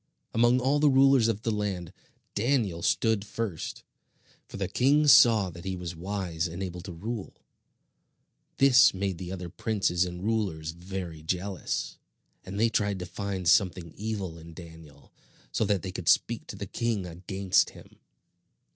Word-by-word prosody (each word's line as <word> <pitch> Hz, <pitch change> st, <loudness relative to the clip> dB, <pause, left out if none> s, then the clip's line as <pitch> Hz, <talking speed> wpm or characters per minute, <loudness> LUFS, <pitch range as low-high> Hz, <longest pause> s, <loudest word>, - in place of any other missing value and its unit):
Among 120 Hz, +2 st, +4 dB
all 135 Hz, +3 st, +2 dB
the 150 Hz, 0 st, +5 dB
rulers 135 Hz, -3 st, +5 dB
over 110 Hz, -2 st, -2 dB
the 115 Hz, -, 0 dB
land, 100 Hz, -5 st, -3 dB, 0.4 s
Daniel 105 Hz, -7 st, 0 dB
stood 110 Hz, +3 st, +1 dB
first, 105 Hz, -5 st, -5 dB, 0.6 s
for -, -, -9 dB
the -, -, -2 dB
king 145 Hz, +4 st, +3 dB
saw 115 Hz, -8 st, +6 dB
that 85 Hz, +1 st, -11 dB
he 95 Hz, 0 st, -3 dB
was 90 Hz, -1 st, -6 dB
wise 90 Hz, -2 st, -3 dB
and 85 Hz, +3 st, -6 dB
able 90 Hz, -1 st, -5 dB
to 95 Hz, -, -8 dB
rule. 105 Hz, +5 st, -6 dB, 1.2 s
This 130 Hz, -6 st, +6 dB
made 95 Hz, -2 st, -2 dB
the 90 Hz, -1 st, -6 dB
other 90 Hz, -2 st, -5 dB
princes 95 Hz, 0 st, 0 dB
and 90 Hz, 0 st, -5 dB
rulers 95 Hz, -8 st, -1 dB
very 85 Hz, -2 st, -7 dB
jealous, 90 Hz, +4 st, -3 dB, 0.4 s
and 100 Hz, +2 st, -6 dB
they 115 Hz, -, +4 dB
tried 105 Hz, -2 st, 0 dB
to 90 Hz, -, -5 dB
find 95 Hz, 0 st, -4 dB
something 90 Hz, -2 st, +2 dB
evil 100 Hz, -6 st, -4 dB
in 80 Hz, 0 st, -12 dB
Daniel, 80 Hz, -4 st, -13 dB, 0.4 s
so 110 Hz, -, 0 dB
that 100 Hz, -3 st, 0 dB
they 95 Hz, -, -4 dB
could 90 Hz, -2 st, -2 dB
speak 115 Hz, -1 st, +2 dB
to -, -, -7 dB
the 100 Hz, 0 st, -5 dB
king 110 Hz, -1 st, -2 dB
against 90 Hz, +2 st, 0 dB
him. -, -, -16 dB
95 Hz, 160 wpm, -28 LUFS, 90-110 Hz, 1.2 s, saw